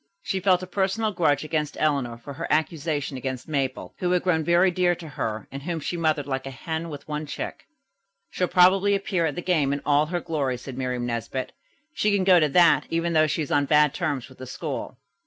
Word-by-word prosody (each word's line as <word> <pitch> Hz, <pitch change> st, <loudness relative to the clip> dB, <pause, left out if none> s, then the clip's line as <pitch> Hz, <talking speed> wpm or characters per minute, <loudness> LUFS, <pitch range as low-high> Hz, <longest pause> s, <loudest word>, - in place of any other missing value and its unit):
She 190 Hz, -, -1 dB
felt 185 Hz, -1 st, +3 dB
a -, -, -3 dB
personal 195 Hz, +4 st, 0 dB
grudge 160 Hz, -7 st, +1 dB
against 155 Hz, -1 st, -2 dB
Eleanor 140 Hz, -6 st, 0 dB
for 140 Hz, +4 st, -9 dB
her -, -, -5 dB
accusation 155 Hz, -3 st, -1 dB
against 130 Hz, -1 st, -5 dB
Mabel, 135 Hz, -4 st, -2 dB
who 180 Hz, -, 0 dB
had 180 Hz, 0 st, +2 dB
grown 165 Hz, -3 st, +2 dB
very 175 Hz, +3 st, +4 dB
dear 175 Hz, 0 st, +2 dB
to 165 Hz, -2 st, -10 dB
her 110 Hz, -5 st, -4 dB
and 135 Hz, -, -6 dB
whom 165 Hz, +2 st, -3 dB
she 165 Hz, -, -3 dB
mothered 155 Hz, -4 st, 0 dB
like 135 Hz, -1 st, -3 dB
a -, -, -3 dB
hen 160 Hz, +5 st, -5 dB
with 145 Hz, -2 st, -9 dB
one 150 Hz, 0 st, -4 dB
chicken. 145 Hz, -, -5 dB, 0.7 s
"She'll 180 Hz, -, 0 dB
probably 190 Hz, +3 st, +5 dB
appear 190 Hz, -4 st, 0 dB
at 145 Hz, -, -3 dB
the 175 Hz, -, -5 dB
game 155 Hz, -7 st, +2 dB
in 140 Hz, -, -1 dB
all 145 Hz, +1 st, +3 dB
her 175 Hz, +2 st, -2 dB
glory," 140 Hz, -6 st, -2 dB
said 130 Hz, +1 st, -8 dB
Miriam 125 Hz, -1 st, -2 dB
Nesbit. 120 Hz, +2 st, -3 dB, 0.4 s
"She 210 Hz, -, +1 dB
can 200 Hz, -2 st, +2 dB
go 185 Hz, -2 st, +6 dB
to 155 Hz, -2 st, +2 dB
that, 170 Hz, +4 st, +4 dB
even 165 Hz, +1 st, 0 dB
though 155 Hz, -1 st, +4 dB
she 155 Hz, +1 st, -1 dB
is 145 Hz, -, -7 dB
on 145 Hz, 0 st, +3 dB
bad 150 Hz, 0 st, +4 dB
terms 150 Hz, -7 st, -2 dB
with 130 Hz, -, -17 dB
the 130 Hz, -, -8 dB
school." -, -, -5 dB
155 Hz, 225 wpm, -25 LUFS, 140-175 Hz, 0.7 s, go